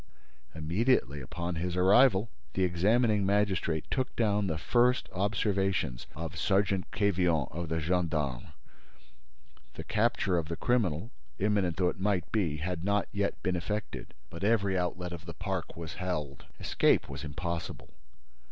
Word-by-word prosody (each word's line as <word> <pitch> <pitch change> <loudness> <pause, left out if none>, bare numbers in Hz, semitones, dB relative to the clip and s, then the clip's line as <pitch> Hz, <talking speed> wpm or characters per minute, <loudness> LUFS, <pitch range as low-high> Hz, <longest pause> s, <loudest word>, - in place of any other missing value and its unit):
Immediately 80 - +1
upon 85 +6 -4
his 90 +1 -2
arrival, 105 +3 +5 0.2
the 95 - +2
examining 105 +5 +3
magistrate 95 -5 +1
took 130 -1 -1
down 105 -3 +2
the 80 -3 -1
first 125 +8 +2
observations 95 - 0
of 85 +2 -5
Sergeant 95 0 +1
Quevillon 90 - +1
of 85 +2 -4
the 80 0 0
gendarmes. 75 -6 -1 1.3
The - - -6
capture 105 -5 +1
of 80 - -4
the 85 - -3
criminal, 110 -4 0 0.3
imminent 100 -4 +1
though 90 -2 +3
it - - -6
might 95 -3 0
be, 85 -9 0
had 85 +2 -3
not 100 +1 +1
yet 100 0 -2
been 90 - +1
effected, 105 +5 -4 0.2
but 85 +3 -7
every 100 -3 +2
outlet 90 0 -2
of 85 0 -8
the 85 - -7
park - - -4
was 85 -2 -6
held. 75 -7 -4
Escape - - +2
was 70 +2 -7
impossible. 85 +3 -5
90 Hz, 145 wpm, -30 LUFS, 85-100 Hz, 1.3 s, arrival